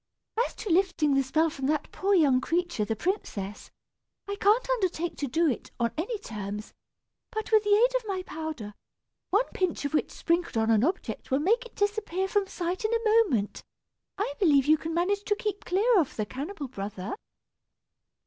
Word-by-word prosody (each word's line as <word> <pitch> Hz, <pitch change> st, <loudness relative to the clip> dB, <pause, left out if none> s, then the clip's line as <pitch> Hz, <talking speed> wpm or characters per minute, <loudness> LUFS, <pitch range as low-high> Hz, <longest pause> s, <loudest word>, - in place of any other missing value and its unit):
As -, -, -14 dB
to 425 Hz, -, -6 dB
lifting 335 Hz, -5 st, +3 dB
the 275 Hz, -, +4 dB
spell 310 Hz, +5 st, +1 dB
from 270 Hz, -4 st, -3 dB
that 300 Hz, 0 st, -1 dB
poor 395 Hz, +1 st, +1 dB
young 275 Hz, -7 st, +4 dB
creature, 345 Hz, -6 st, 0 dB
the 225 Hz, +1 st, -1 dB
princess, 210 Hz, -, -3 dB, 0.6 s
I 400 Hz, -, -2 dB
can't 430 Hz, +5 st, +3 dB
undertake 365 Hz, -8 st, 0 dB
to 285 Hz, -, -2 dB
do 325 Hz, +6 st, +2 dB
it, 255 Hz, -, -2 dB
on 235 Hz, -1 st, +1 dB
any 405 Hz, +9 st, -2 dB
terms; 210 Hz, -, -6 dB, 0.6 s
but 435 Hz, -2 st, -4 dB
with 435 Hz, -1 st, +6 dB
the 415 Hz, -1 st, +4 dB
aid -, -, +4 dB
of 475 Hz, -3 st, -8 dB
my 380 Hz, -2 st, -2 dB
powder, 310 Hz, -11 st, -6 dB, 0.6 s
one 415 Hz, +6 st, +3 dB
pinch 365 Hz, -5 st, -1 dB
of 285 Hz, -, -2 dB
which 305 Hz, -, +1 dB
sprinkled 340 Hz, -6 st, -1 dB
on 220 Hz, 0 st, +2 dB
an 220 Hz, 0 st, +4 dB
object 355 Hz, +7 st, -2 dB
will 265 Hz, -, +3 dB
make 450 Hz, -, +2 dB
it -, -, -28 dB
disappear 410 Hz, -3 st, 0 dB
from 400 Hz, 0 st, +1 dB
sight 355 Hz, +1 st, -3 dB
in 435 Hz, -, +1 dB
a 455 Hz, -1 st, +4 dB
moment, 215 Hz, -, -1 dB, 0.5 s
I 395 Hz, -8 st, -1 dB
believe 290 Hz, -8 st, +5 dB
you 310 Hz, +1 st, +5 dB
can 325 Hz, 0 st, -4 dB
manage 400 Hz, +4 st, +1 dB
to 415 Hz, -, +2 dB
keep 410 Hz, -1 st, -4 dB
clear 410 Hz, +4 st, +3 dB
of 305 Hz, -, -1 dB
the 215 Hz, -, -1 dB
cannibal 285 Hz, -, -5 dB
brother." 200 Hz, -4 st, -5 dB
340 Hz, 185 wpm, -28 LUFS, 270-410 Hz, 0.6 s, with